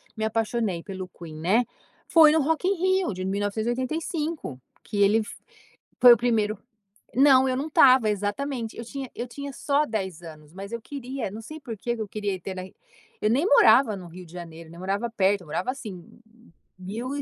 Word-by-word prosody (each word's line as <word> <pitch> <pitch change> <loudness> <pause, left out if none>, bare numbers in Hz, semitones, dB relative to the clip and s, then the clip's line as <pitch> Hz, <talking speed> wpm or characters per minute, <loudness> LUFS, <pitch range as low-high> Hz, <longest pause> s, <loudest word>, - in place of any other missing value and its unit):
me 220 - -4
apaixonei 220 -4 -1
pelo 190 -2 -7
Queen, 165 -3 -11
né, 195 +10 +2 0.4
foi 315 -3 +7
no 320 - +3
Rock 320 +5 0
in 390 +2 +2
Rio 375 - +1
de 185 0 -5
1985 240 - -2 0.3
que 205 - -2
ele 210 +3 +4
fo - - -10 0.7
foi 245 -1 +10
o - - +7
primeiro 220 -3 +1 0.6
Não, 265 0 +6
eu 255 - 0
não 290 +4 -3
estava 255 -6 +6
exatamente, 225 +4 -3
eu 230 - -6
tinha 265 +1 -7
eu 240 - -4
tinha 280 +3 -7
só 290 +3 +1
10 190 -7 -4
anos, 155 -2 -12
mas 195 +2 -8
eu 235 -1 -5
queria, 265 -5 -5
não 215 - -8
sei 310 +8 -9
porque 235 -2 -4
que 225 - -3
eu 215 - -4
queria 205 -2 -3
ter 190 +1 -6
na 185 - -5 0.6
eu 210 - +3
nem 275 +9 +2
morava 235 - +6
no 180 -2 -9
Rio 180 +2 -11
de 165 - -17
Janeiro, 165 -2 -9
nem 170 - -12
morava 200 +5 -2
perto, 200 -2 +2
eu - - -15
morava 170 +9 -2
assim 210 -10 -8 0.7
1.000 210 +7 -5
220 Hz, 190 wpm, -25 LUFS, 190-265 Hz, 0.7 s, foi